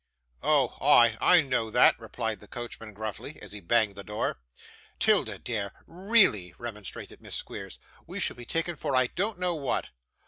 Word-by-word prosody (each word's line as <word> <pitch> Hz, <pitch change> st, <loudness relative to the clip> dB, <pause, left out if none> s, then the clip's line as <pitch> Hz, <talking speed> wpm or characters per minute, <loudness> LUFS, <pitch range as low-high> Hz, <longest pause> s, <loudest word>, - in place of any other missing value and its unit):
'Oh, 140 Hz, -5 st, +2 dB
ah! 120 Hz, -5 st, +6 dB
I 180 Hz, -1 st, +7 dB
know 130 Hz, -6 st, -1 dB
that,' 110 Hz, -, +5 dB
replied 110 Hz, -2 st, -4 dB
the 105 Hz, -, -15 dB
coachman 115 Hz, -1 st, -7 dB
gruffly, 110 Hz, 0 st, -6 dB
as -, -, -10 dB
he 105 Hz, -, -7 dB
banged 110 Hz, +2 st, +2 dB
the 100 Hz, -, -9 dB
door. 105 Hz, -11 st, -3 dB, 0.6 s
''Tilda, -, -, +2 dB
dear, 105 Hz, -4 st, -4 dB
really,' 175 Hz, -, +2 dB
remonstrated 105 Hz, -5 st, -8 dB
Miss -, -, -3 dB
Squeers, -, -, -5 dB, 0.3 s
'we -, -, -6 dB
shall -, -, 0 dB
be 120 Hz, 0 st, -10 dB
taken 165 Hz, +5 st, -1 dB
for 140 Hz, -2 st, -2 dB
I 130 Hz, 0 st, +5 dB
don't 200 Hz, -, -2 dB
know 180 Hz, -1 st, 0 dB
what. 140 Hz, -5 st, -2 dB
120 Hz, 170 wpm, -28 LUFS, 105-155 Hz, 0.6 s, I